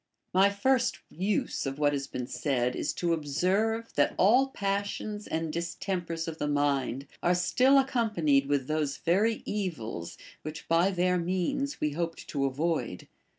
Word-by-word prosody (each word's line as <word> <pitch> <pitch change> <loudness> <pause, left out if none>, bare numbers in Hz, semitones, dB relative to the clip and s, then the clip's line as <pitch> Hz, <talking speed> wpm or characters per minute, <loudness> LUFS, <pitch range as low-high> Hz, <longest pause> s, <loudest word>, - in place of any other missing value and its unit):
My 190 +2 +6
first 245 +5 +1
use 190 -4 -1
of 135 0 -4
what 145 -1 +2
has 140 -1 -2
been 125 - -4
said 125 -2 -1
is - - -1
to 170 -1 0
observe, 190 +10 0
that 145 - +2
all 245 +8 +5
passions 205 -1 -3
and 160 -1 -2
distempers 170 -1 -3
of 160 -1 -5
the 150 - -1
mind 140 -2 0 0.2
are 175 +1 +3
still 255 +10 +4
ac 270 -1 +1
companied 170 - +2
with 140 -2 +1
those 150 -1 -1
very 205 +7 +1
evils 120 - -4 0.2
which 155 +1 -7
by 165 +3 +4
their 180 -1 +1
means 185 +11 -1
we 150 - 0
hoped 165 +2 -4
to 140 -2 0
avoid. 135 - -2
170 Hz, 155 wpm, -29 LUFS, 145-200 Hz, 0.2 s, My